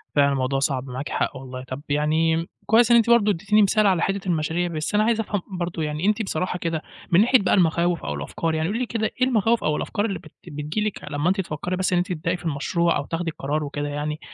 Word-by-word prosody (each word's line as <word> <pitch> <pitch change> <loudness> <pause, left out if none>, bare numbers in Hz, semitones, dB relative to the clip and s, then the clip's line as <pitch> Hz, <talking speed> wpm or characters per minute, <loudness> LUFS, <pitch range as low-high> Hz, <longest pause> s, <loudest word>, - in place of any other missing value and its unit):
فعلًا 140 -1 +4
الموضوع 135 0 0
صعب، 135 -2 0
معاكِ 130 +3 -5
حق - - -1
والله. 130 -1 -8
طَب 130 +2 -7
يعني 160 +3 +1 0.2
كويس 230 +2 +4
إن 235 - +8
أنتِ 230 0 +3
برضه 215 -3 +5
ادّيتيني 210 +4 +2
مثال 210 +1 +4
على 180 -3 +2
حتّة 195 0 -1
المشاريع، 165 +1 0
بس 160 +3 -3
أنا 210 - +4
عايز 225 0 +2
أفهم 205 -3 -1 0.2
برضه 170 -2 -2
يعني 150 +3 -2
أنتِ 215 +2 +2
بصراحة 180 -2 -2
كده 165 -2 -2 0.3
من 175 +3 +6
ناحية 250 +3 +5
بقى 195 - +1
المخاوف 170 -1 +2
أو 75 - -2
الأفكار، 160 - -2
يعني 160 0 0
قولي 215 +5 -2
لي 255 - 0
كده 225 -2 -2 0.2
إيه 255 - +5
المخاوف 230 -1 +2
أو 150 0 +1
الأفكار 205 0 -2
اللي 195 -6 -3
بت 155 -4 -15 0.2
بتيجي 150 +7 -3
لِك 210 - -6
لمّا 145 +4 +1
أنت 190 +1 +1
تفكّري 175 +1 -4
بس 185 0 0
إن - - +3
أنتِ 175 +1 +1
تبدئي 170 +2 -2
في 175 - -14
المشروع 170 +3 +1
أو 140 - -3
تاخدي 165 +1 -3
القرار 150 +1 -2
وكده 145 0 -4
يعني؟ 150 +1 -3
170 Hz, 245 wpm, -23 LUFS, 150-200 Hz, 0.3 s, إن